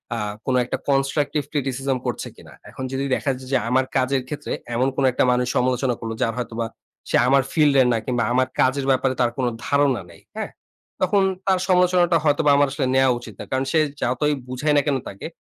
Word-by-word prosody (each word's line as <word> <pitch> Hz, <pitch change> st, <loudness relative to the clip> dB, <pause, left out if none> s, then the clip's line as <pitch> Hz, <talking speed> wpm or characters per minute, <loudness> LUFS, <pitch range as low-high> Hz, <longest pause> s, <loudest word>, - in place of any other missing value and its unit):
আ -, -, -3 dB, 0.3 s
কোনো 130 Hz, -1 st, +1 dB
একটা -, -, -3 dB
constructive 140 Hz, +2 st, +1 dB
criticism 135 Hz, -2 st, -1 dB
করছে 120 Hz, -, -3 dB
কিনা? -, -, -15 dB, 0.2 s
এখন 130 Hz, -, -8 dB
যদি 135 Hz, +1 st, -2 dB
দেখা 140 Hz, -, -2 dB
যায় 130 Hz, -, -11 dB
যে, -, -, +5 dB
আমার 130 Hz, +1 st, +2 dB
কাজের 130 Hz, +1 st, +1 dB
ক্ষেত্রে 150 Hz, +2 st, -6 dB, 0.2 s
এমন 125 Hz, +3 st, +2 dB
কোনো 135 Hz, -, +1 dB
একটা 125 Hz, -, +1 dB
মানুষ 125 Hz, 0 st, +1 dB
সমালোচনা 125 Hz, 0 st, +1 dB
করলো, 115 Hz, -1 st, -4 dB
যার 115 Hz, -2 st, +1 dB
হয়তোবা, 115 Hz, -1 st, -3 dB, 0.4 s
সে -, -, +1 dB
আমার 135 Hz, +1 st, +4 dB
ফিল্ডের 140 Hz, -5 st, +4 dB
না -, -, +1 dB
কিংবা 125 Hz, -2 st, 0 dB
আমার 130 Hz, +1 st, +2 dB
কাজের 135 Hz, +1 st, +1 dB
ব্যাপারে 130 Hz, 0 st, +1 dB
তার 120 Hz, -1 st, +2 dB
কোনো 125 Hz, -2 st, +1 dB, 0.2 s
ধারণা 140 Hz, -5 st, +2 dB
নেই। -, -, -17 dB, 0.2 s
হ্যাঁ? -, -, -4 dB, 0.5 s
তখন 200 Hz, -1 st, +3 dB, 0.2 s
তার 190 Hz, -1 st, +3 dB
সমালোচনাটা 180 Hz, -2 st, +4 dB
হয়তোবা 145 Hz, 0 st, +3 dB
আমার 145 Hz, 0 st, +4 dB
আসলে 135 Hz, -1 st, -1 dB
নেয়া 135 Hz, 0 st, +4 dB
উচিত 120 Hz, -, -10 dB
না। -, -, -6 dB
কারণ 130 Hz, +1 st, 0 dB
সে 160 Hz, -, +3 dB, 0.2 s
যতই 130 Hz, +5 st, +1 dB
বুঝাই 130 Hz, +4 st, 0 dB
না -, -, +5 dB
কেনো 140 Hz, -3 st, +1 dB
তাকে? 100 Hz, -, -8 dB
135 Hz, 205 wpm, -22 LUFS, 125-145 Hz, 0.5 s, যে